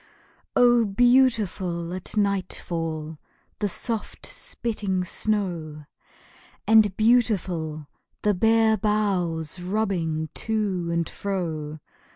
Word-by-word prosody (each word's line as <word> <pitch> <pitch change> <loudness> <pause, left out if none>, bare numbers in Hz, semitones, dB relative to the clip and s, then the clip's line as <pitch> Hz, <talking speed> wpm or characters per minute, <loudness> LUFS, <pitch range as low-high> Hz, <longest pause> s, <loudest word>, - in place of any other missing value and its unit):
Oh, 240 -1 +5
beautiful 205 -7 +2
at 185 +3 -6
nightfall 165 -6 -2 0.4
The 205 -1 0
soft 225 +3 -4
spitting 200 -5 -3
snow! 175 -7 -2 0.8
And 215 -3 +5
beautiful 185 -10 +1 0.4
the 210 - +3
bare 220 +2 +3
boughs 185 -6 0
Rubbing 175 -5 -1
to 205 -6 -1
and 170 -1 0
fro! 160 -6 -4
190 Hz, 85 wpm, -25 LUFS, 170-215 Hz, 0.8 s, Oh